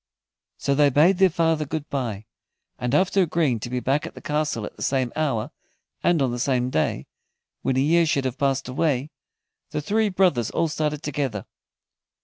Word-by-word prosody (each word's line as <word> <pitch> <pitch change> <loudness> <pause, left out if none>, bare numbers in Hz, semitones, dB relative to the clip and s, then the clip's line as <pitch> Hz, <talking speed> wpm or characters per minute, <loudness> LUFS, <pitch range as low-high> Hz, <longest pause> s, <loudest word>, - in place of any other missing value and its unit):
So 140 - 0
they 145 0 +4
bade 165 +8 +4
their 190 -1 +6
father 165 -2 +1
good 150 0 -4
bye, 115 -7 -3 0.5
and 125 +2 0
after 190 +4 +3
agreeing 160 -8 +1
to 115 - -6
be 125 0 -1
back 135 +4 0
at - - -11
the - - -8
castle 150 -7 -1
at - - -9
the - - -13
same 130 -3 0
hour, 140 -9 -1 0.5
and 170 -5 +3
on 130 - 0
the 120 - -4
same 125 -1 0
day, 80 - 0 0.6
when 130 -1 0
a - - +3
year 165 +3 +3
should 140 -4 +1
have 130 +3 -3
passed 135 -3 0
away, 135 +1 0 0.6
the - - -3
three 210 +8 +1
brothers 180 - +2
all 165 -1 0
started 150 -1 -2
together. 135 - -3
145 Hz, 185 wpm, -24 LUFS, 125-160 Hz, 0.6 s, their